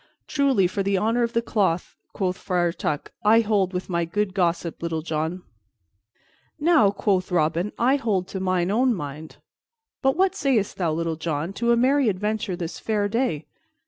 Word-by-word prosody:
"Truly, 275 -9 +2
for 185 +3 -1
the 195 0 +1
honor 225 +5 +1
of 235 0 0
the 230 - +1
cloth," 190 -7 0 0.2
quoth 185 -2 -1
Friar 175 -2 0
Tuck, 150 -3 -3
"I 220 +2 +6
hold 205 -4 +1
with 180 0 -4
my 170 -2 0
good 190 +3 -1
gossip, 170 -3 -1
Little 165 -2 -2
John." 160 +3 -3 1.2
"Now," 305 - +5
quoth 195 -2 0
Robin, 170 +3 +1
"I 260 +4 +3
hold 200 -9 -1
to 190 - -4
mine 185 -1 0
own 245 +2 +2
mind. 150 -1 -7 0.7
But 270 +1 +2
what 380 0 +3
sayst 240 -8 0
thou, 170 -4 0
Little 165 0 -2
John, 160 +2 -3
to 235 +4 +1
a 235 - +4
merry 265 +1 +3
adventure 210 0 -2
this 170 -1 -5
fair 210 -2 0
day? 205 - -1
195 Hz, 175 wpm, -24 LUFS, 170-230 Hz, 1.2 s, I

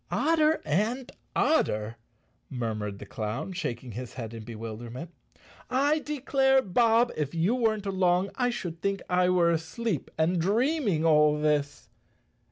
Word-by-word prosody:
"Odder 320 -1 +2
and 225 - -1 0.2
odder!" 110 - +1 0.5
murmured 110 -5 -3
the - - -9
clown, 110 - -4
shaking 125 -8 -4
his 120 +3 -7
head 115 -3 -6
in 115 -1 -7
bewilderment. 115 +7 -7 0.6
"I 285 +4 +2
declare, 270 -2 +2
Bob, 230 +4 +3
if 150 +1 -3
you 170 +7 +2
weren't 220 -4 0
along 185 -1 +1
I 245 -1 0
should 175 -8 -5
think 200 0 -1
I 180 0 +3
were 175 -2 +3
asleep 165 - -2
and 165 +2 +2
dream¬ 245 - +1
ing 160 -3 +1
all 150 -1 +4
this." 150 -2 0
175 Hz, 140 wpm, -28 LUFS, -, 0.6 s, all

